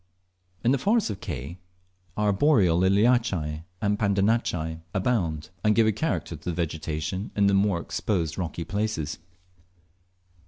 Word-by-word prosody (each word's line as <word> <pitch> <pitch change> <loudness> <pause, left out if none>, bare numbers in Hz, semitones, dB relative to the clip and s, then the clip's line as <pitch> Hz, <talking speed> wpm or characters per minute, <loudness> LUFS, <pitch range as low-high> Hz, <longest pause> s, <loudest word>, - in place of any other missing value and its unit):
In 120 - +4
the 135 - +2
forests 210 - +2
of 100 - -6
Ke, 70 +7 -5 0.6
arboreal 105 - +3
Liliaceae 95 -6 +2 0.2
and 105 0 +1
Pandanaceae 100 -6 +1
abound, 95 -8 0
and 105 0 +3
give 115 - +5
a 110 - +4
character 110 - -2
to 80 - -15
the 85 - -2
vegetation 80 +3 -3
in 100 - +3
the 100 - +4
more 95 -2 +2
exposed 85 -3 -2
rocky 85 -2 -3
places. 100 -7 -2
95 Hz, 130 wpm, -26 LUFS, 80-110 Hz, 0.6 s, give